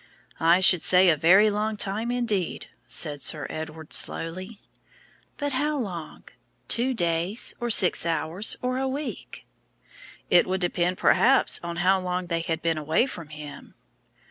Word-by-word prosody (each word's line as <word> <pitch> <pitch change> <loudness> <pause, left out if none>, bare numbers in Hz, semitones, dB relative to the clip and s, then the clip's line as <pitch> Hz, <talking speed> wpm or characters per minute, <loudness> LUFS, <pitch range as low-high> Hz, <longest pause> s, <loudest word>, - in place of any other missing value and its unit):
"I 170 +3 +3
should 180 -2 +5
say 185 0 +6
a 165 - +4
very 190 +8 +4
long 210 +1 -2
time, 210 +4 -3
indeed," 230 -8 -2 0.2
said 145 +4 -1
Sir 150 -3 0
Edward, 155 0 -8
slowly. 185 +6 -3 0.8
"But 285 -1 -3
how 295 +3 -1
long? 180 - -7 0.4
Two 255 +2 +1
days, 175 +3 -1
or 240 - -3
six 190 -5 +5
hours, 165 +4 0
or 255 +1 -2
a 265 - -2
week?" 280 +2 -7 0.9
"It 175 - +4
would 190 +1 -2
depend 175 0 -1
perhaps 270 +3 +3
on 170 0 -6
how 190 +1 +3
long 180 0 -3
they 170 -1 -2
had 165 0 -4
been 165 -2 -1
away 155 - +1
from 165 - -9
Him." 150 -1 -11
180 Hz, 150 wpm, -24 LUFS, 165-220 Hz, 0.9 s, say